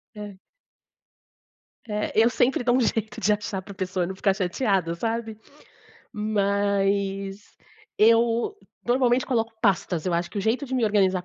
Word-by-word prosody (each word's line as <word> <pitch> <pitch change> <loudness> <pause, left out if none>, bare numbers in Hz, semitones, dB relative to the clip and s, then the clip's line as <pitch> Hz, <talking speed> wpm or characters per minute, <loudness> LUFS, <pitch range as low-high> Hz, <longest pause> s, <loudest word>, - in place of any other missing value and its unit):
É. 205 -2 -8 1.5
É, 210 0 -2
eu 225 +2 +5
sempre 245 +1 +1
dou 245 0 +3
um - - +3
jeito 220 -1 -1
de 210 +3 +3
achar 205 -2 -3
pra 200 +2 -11
pessoa 185 -1 -2
não 190 +2 -5
ficar 195 0 +1
chateada, 185 -2 0
sabe, 225 +4 -3 0.8
mas 200 -1 -1 0.4
eu 230 - +3 0.3
normalmente 245 0 +2
coloco 230 -3 -1
pastas, 185 -5 +1
eu 180 - -1
acho 170 0 0
que 205 - -5
o - - 0
jeito 225 +7 0
de 260 - -4
me 245 -3 +2
organizar 190 -3 +2
210 Hz, 150 wpm, -25 LUFS, 195-230 Hz, 1.5 s, eu